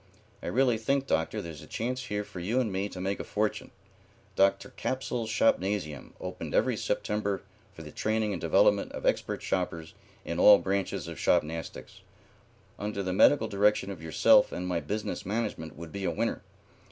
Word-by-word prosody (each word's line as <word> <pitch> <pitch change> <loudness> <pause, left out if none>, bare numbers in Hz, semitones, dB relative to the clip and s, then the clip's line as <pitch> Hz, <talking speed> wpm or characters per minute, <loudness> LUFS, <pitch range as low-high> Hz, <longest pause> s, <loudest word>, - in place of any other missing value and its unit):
I - - -6
really 125 -2 +2
think, 135 +4 0
Doctor, 100 +1 -1
there's 80 -4 -8
a - - -12
chance 125 +3 -3
here 105 -2 -2
for 95 - -9
you 105 +9 0
and 115 -5 0
me 95 +2 -2
to 95 - -8
make 95 +2 -2
a - - -3
fortune. 105 0 -2 0.7
Dr. 100 0 +2
Capsule's 125 -3 -3
Shopnasium, 95 -8 0
opened - - -5
every - - +3
September 100 -2 -2 0.3
for - - -9
the - - -10
training 110 -1 0
and 95 - -4
development - - +3
of - - -6
expert - - 0
shoppers 85 -3 -2 0.3
in 85 +1 -3
all 105 +2 +9
branches 100 0 -2
of - - -7
shopnastics, 80 -4 -1 0.8
under 105 -1 -3
the 95 -1 -2
medical 110 +4 +5
direction 105 0 +2
of 90 -5 -8
yourself 80 0 +4
and 90 - -4
my 90 -2 0
business 100 +8 -4
management 105 -6 -3
would 85 -1 -8
be 100 +2 -4
a - - +2
winner. 115 +2 -1
100 Hz, 175 wpm, -29 LUFS, 90-110 Hz, 0.8 s, all